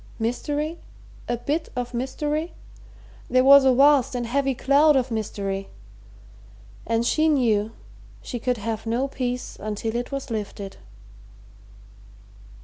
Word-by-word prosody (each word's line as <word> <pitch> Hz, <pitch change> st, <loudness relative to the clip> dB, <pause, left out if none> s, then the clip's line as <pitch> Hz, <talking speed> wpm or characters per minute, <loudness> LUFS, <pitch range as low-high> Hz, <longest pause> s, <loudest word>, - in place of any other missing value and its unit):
Mystery? 295 Hz, +8 st, -2 dB, 0.5 s
a 240 Hz, -, 0 dB
bit 300 Hz, +7 st, -2 dB
of 245 Hz, 0 st, -4 dB
mystery? 295 Hz, +6 st, -2 dB, 0.8 s
There 255 Hz, 0 st, +4 dB
was 275 Hz, 0 st, +8 dB
a 265 Hz, -, +6 dB
vast 275 Hz, 0 st, +4 dB
and 240 Hz, -1 st, -2 dB
heavy 270 Hz, +2 st, 0 dB
cloud 285 Hz, +4 st, +4 dB
of 260 Hz, -1 st, +1 dB
mystery, 195 Hz, -3 st, -3 dB, 1.2 s
and 230 Hz, 0 st, +1 dB
she 310 Hz, +6 st, +2 dB
knew 225 Hz, -7 st, +2 dB, 0.5 s
she 245 Hz, -, -6 dB
could 250 Hz, +1 st, -1 dB
have 220 Hz, +1 st, -4 dB
no 240 Hz, +4 st, 0 dB
peace 250 Hz, -2 st, -4 dB
until 215 Hz, +2 st, -4 dB
it 245 Hz, +3 st, -3 dB
was 275 Hz, -2 st, -5 dB
lifted. 205 Hz, -2 st, -5 dB
250 Hz, 125 wpm, -24 LUFS, 225-280 Hz, 1.2 s, was